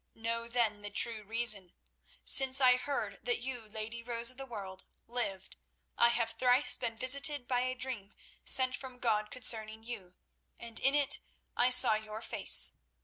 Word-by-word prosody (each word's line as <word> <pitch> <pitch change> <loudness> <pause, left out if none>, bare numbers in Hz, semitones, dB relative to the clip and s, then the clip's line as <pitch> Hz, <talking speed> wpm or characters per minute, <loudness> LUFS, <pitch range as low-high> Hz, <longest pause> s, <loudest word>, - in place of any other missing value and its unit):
Know 230 +1 -5
then 230 -3 -2
the 205 - -8
true 215 +1 0
reason. 215 -4 +1 0.5
Since 265 0 +6
I 255 -2 +5
heard 250 -6 -5
that 245 +1 -2
you, 245 -3 -7
Lady 220 +2 -6
Rose 235 0 -1
of 255 - -19
the 270 0 -9
World, 195 -5 -10 0.2
lived, 215 -6 -6 0.4
I 235 - +4
have 230 -1 -2
thrice 250 +4 +1
been 230 -2 -4
visited 275 +1 +1
by 250 -1 -1
a 255 +1 -3
dream 250 -6 -5 0.3
sent 255 -1 +3
from 260 -2 -11
God 215 -3 -2
concerning 220 -3 -3
you, 200 -7 -10 0.4
and 230 -1 -4
in 270 +2 +1
it 285 -1 +1 0.4
I 245 - +2
saw 250 -2 +9
your 215 +1 -7
face. - - +2
235 Hz, 165 wpm, -30 LUFS, 215-255 Hz, 0.5 s, saw